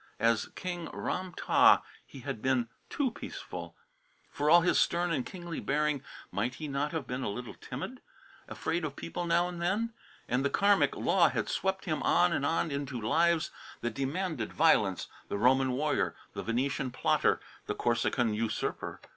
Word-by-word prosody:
As 115 0 +2
King 175 -2 -4
Ram 185 0 -3
tah - - +5 0.2
he 135 - -12
had 130 -4 -5
been 130 -3 +2 0.2
too 275 -4 0
peaceful. - - -7 0.6
For 145 +1 0
all 170 +2 +8
his 175 - +3
stern 175 0 +2
and 140 -6 0
kingly 175 -1 -6
bearing 150 -1 0 0.3
might 115 +5 -1
he 155 - -5
not 140 +1 -1
have 160 -5 -3
been 125 +1 -4
a 125 - -1
little 120 +4 -5
timid 190 - -7 0.5
afraid 165 +1 -2
of 145 -2 -3
people 175 +1 -4
now 170 +1 +3
and 175 -1 -6
then? 210 +7 0 0.3
And 125 +2 +1
the 140 - +2
Karmic 200 +4 +3
law - - +4
had - - -2
swept 190 0 -1
him 155 -4 -1
on 175 -1 +4
and 140 - 0
on 165 0 0
into 140 -3 -3
lives 165 +9 +2 0.3
that 120 -1 -2
demanded 140 - -2
violence, - - +3 0.2
the - - -2
Roman 130 +3 +4
warrior, 145 +3 0 0.2
the - - -4
Venetian 130 +3 -1
plotter, - - +2 0.3
the - - -1
Corsican 115 -3 +1
usurper! 110 +1 -2
145 Hz, 170 wpm, -31 LUFS, 125-175 Hz, 0.6 s, all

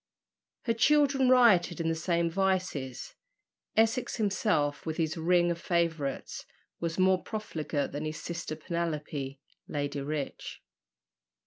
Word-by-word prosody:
Her 230 - +1
children 275 +1 +4
rioted 220 -10 +5
in 165 - -1
the 165 - +2
same 170 +1 0
vices. 180 -8 -1 0.6
Essex 225 +2 +2
himself, 200 - 0
with 160 -1 -4
his 160 -1 0
ring 175 +1 +3
of 170 0 -4
favourites, 165 -5 -1 0.4
was 170 0 -2
not 185 - +4
more 185 -1 +3
profligate 160 -9 -3
than 145 +2 -4
his 155 0 -4
sister 170 -2 -5
Penelope, 150 -5 -3 0.3
Lady 145 -1 -3
Rich. 145 0 -5
170 Hz, 125 wpm, -29 LUFS, 155-190 Hz, 0.6 s, rioted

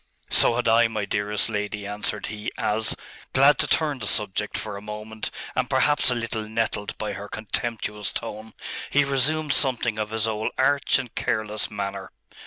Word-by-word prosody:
'So 115 - +7
had 125 - 0
I, 115 +1 +5
my 110 -2 -3
dearest 105 0 +2
lady,' 105 -1 -3
answered 105 +1 -2
he, 105 0 -5
as, 105 0 +1 0.4
glad 140 +2 +6
to - - +2
turn 150 -4 +1
the 105 - -2
subject 105 +1 0
for 105 0 -5
a 100 - -7
moment, 105 +1 -6 0.3
and - - 0
perhaps 145 -2 +4
a 125 - +3
little 115 -2 -3
nettled 110 -2 -2
by 105 -1 -3
her 100 +1 -7
contemptuous 105 -2 -2
tone, 110 +1 -6 0.3
he 145 - +4
resumed 140 +2 +1
something 120 -6 0
of 105 0 -2
his 110 0 +1
old 110 0 -2
arch 140 +1 +3
and 130 -3 -6
careless 110 -1 -1
manner. 100 -2 -5
110 Hz, 175 wpm, -25 LUFS, 105-120 Hz, 0.4 s, So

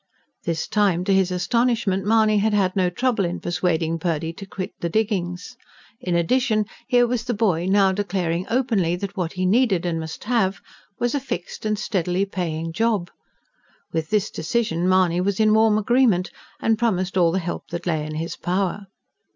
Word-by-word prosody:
This 165 -1 -2
time, 195 -5 +2
to 195 - +1
his 190 -1 +3
astonishment, 195 +1 +1
Mahony 215 -1 +4
had 210 +1 +1
had 190 -2 +1
no 185 -2 +2
trouble 240 +1 0
in 175 0 -2
persuading 170 -2 -1
Purdy 165 -1 -2
to 195 +3 -10
quit 190 -1 -5
the 170 - -2
diggings. 190 0 -2 0.4
In 180 -2 -2
addition, 215 +5 +2 0.2
here 245 -2 +4
was 240 -1 -1
the 240 - -1
boy 185 -6 +1
now 195 -1 +4
declaring 185 -3 -2
openly 225 -9 +1
that 195 +2 -5
what 175 -4 -2
he 185 -1 -1
needed, 195 -3 +2
and 165 -2 -1
must 160 0 -7
have, 210 -4 +1 0.4
was 240 0 0
a 285 - +1
fixed 215 -5 -5
and 215 0 0
steadily 185 -1 0
paying 165 -4 -3
job. 210 -3 0 0.8
With 160 -1 -2
this 210 -1 +1
decision 180 -2 -1
Mahony 180 -2 +3
was 195 +1 -1
in 215 -1 +4
warm 220 -1 +4
agreement, 215 -4 +2 0.3
and 225 -1 +1
promised 190 -6 0
all 175 -3 +4
the 185 - 0
help 175 -2 -4
that 170 0 -5
lay 160 -3 0
in 155 0 -5
his 165 +2 -4
power. 195 +2 -2
190 Hz, 180 wpm, -23 LUFS, 175-215 Hz, 0.8 s, Mahony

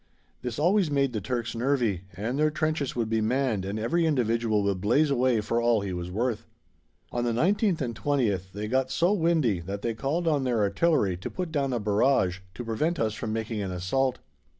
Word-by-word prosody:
This 120 -2 -4
always 180 +3 +3
made 140 -3 +1
the 110 - -2
Turks 120 +1 -3
nervy, 115 -7 0
and 120 +7 -2
their 155 0 +4
trenches 155 -3 -1
would 115 -2 0
be 110 0 0
manned 115 -3 0
and 100 +2 -3
every 165 +10 +1
individual 115 -6 +1
would 100 -2 -1
blaze 140 +9 +3
away 125 -4 +2
for 115 +3 0
all 120 -2 +3
he 100 -2 -3
was 90 0 -4
worth. 115 +4 -2 0.6
On 120 - -1
the 120 - +1
19th 185 - +2
and 120 -3 -2
20th 105 - 0
they 105 +2 -5
got 130 +3 +1
so 175 +8 +2
"windy" 160 - +2
that 100 +4 -6
they 115 - 0
called 145 +10 -2
on 150 -4 +2
their 120 -4 +1
artillery 100 - +2
to 90 - -6
put 180 -3 -4
down 140 -3 0
a 120 - 0
barrage 105 -3 +2 0.2
to 120 - -6
prevent 155 +10 -1
us 110 -2 +1
from 110 0 -4
making 110 -1 -3
an 95 - -3
assault. 105 +9 0
120 Hz, 205 wpm, -27 LUFS, 105-140 Hz, 0.6 s, their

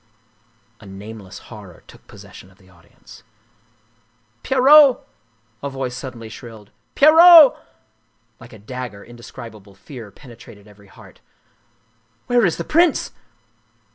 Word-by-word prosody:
A 105 - -16
nameless 100 0 -12 0.2
horror 100 -5 -15
took - - -20
possession 95 - -16
of 95 - -26
the 95 -1 -24
audience. 85 -2 -20 0.6
" 115 0 -43
Pierrot! 270 +1 +4 0.3
" 110 0 -43
a 140 - -5
voice 135 -2 -6
suddenly 125 -3 -10
shrilled. 110 -1 -14
" - - -48
Pierrot! 320 0 +7 0.4
" 110 0 -46
Like 120 - -15
a - - -13
dagger, 110 -1 -10
indescribable 115 -4 -14
fear 115 +1 -13
penetrated 115 -3 -17
every 100 -1 -20
heart. - - -19 1.0
"Where 245 -4 +1
is 170 - -4
the 170 - -5
prince?" 335 - 0
115 Hz, 130 wpm, -18 LUFS, 105-135 Hz, 1.0 s, Pierrot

